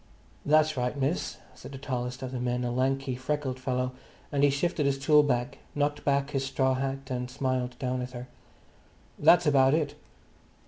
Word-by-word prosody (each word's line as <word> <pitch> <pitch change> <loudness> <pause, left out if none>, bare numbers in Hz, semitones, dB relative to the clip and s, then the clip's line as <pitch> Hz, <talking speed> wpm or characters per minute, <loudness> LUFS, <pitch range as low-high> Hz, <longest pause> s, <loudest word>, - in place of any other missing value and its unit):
"That's 155 0 +3
right, 125 +3 -1
miss," 140 +5 -1 0.2
said - - -11
the - - -6
tallest 125 -1 -4
of 130 - -4
the 130 - -4
men, 125 0 -1
a 120 - -1
lanky, 130 +1 0
freckled 130 0 -2
fellow, 125 -1 -1 0.4
and 140 -1 +1
he 145 - +6
shifted 150 +1 0
his 140 -1 +1
tool 150 +2 +5
bag, 135 -1 -1 0.2
knocked 145 0 0
back 140 0 +1
his 135 -2 -1
straw 135 0 +1
hat 135 0 -3
and 125 0 -2
smiled 130 -1 -2
down 130 -2 -2
at 125 +1 -6
her. 125 0 -7 0.9
"That's 175 0 +6
about 135 -1 +5
it." 150 -3 -1
135 Hz, 180 wpm, -28 LUFS, 125-145 Hz, 0.9 s, he